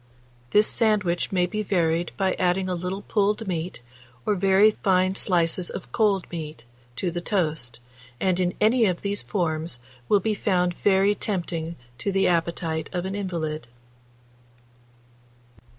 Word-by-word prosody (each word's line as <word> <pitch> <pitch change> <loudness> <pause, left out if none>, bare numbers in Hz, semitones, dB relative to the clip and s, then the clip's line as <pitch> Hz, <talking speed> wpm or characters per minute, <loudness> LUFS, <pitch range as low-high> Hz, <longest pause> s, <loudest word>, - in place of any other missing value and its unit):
This 210 +1 +5
sandwich 205 -7 +1
may 180 -2 +2
be 210 +4 -3
varied 170 -4 0
by 190 -2 +1
adding 185 +1 +1
a 185 - -1
little 180 +3 -4
pulled 210 +1 0
meat, 170 -6 -3 0.4
or - - +2
very 195 +2 +5
fine 185 -2 +2
slices 175 -2 +1
of 185 - -7
cold 205 -5 +2
meat, 155 -7 -7 0.3
to 180 +6 -1
the 175 +1 -4
toast, 155 - -1 0.4
and 185 -1 +1
in 180 -1 0
any 225 +2 +4
of 180 -2 -2
these 200 0 -1
forms 160 -6 -2 0.3
will 205 - +5
be 215 +3 0
found 180 -4 +1
very 195 +2 +3
tempting 170 -5 -2 0.2
to 200 - -1
the 195 0 +2
appetite 165 -2 -1
of 180 -1 -2
an 190 - -3
invalid. 165 -9 -3
185 Hz, 145 wpm, -25 LUFS, 170-200 Hz, 0.4 s, This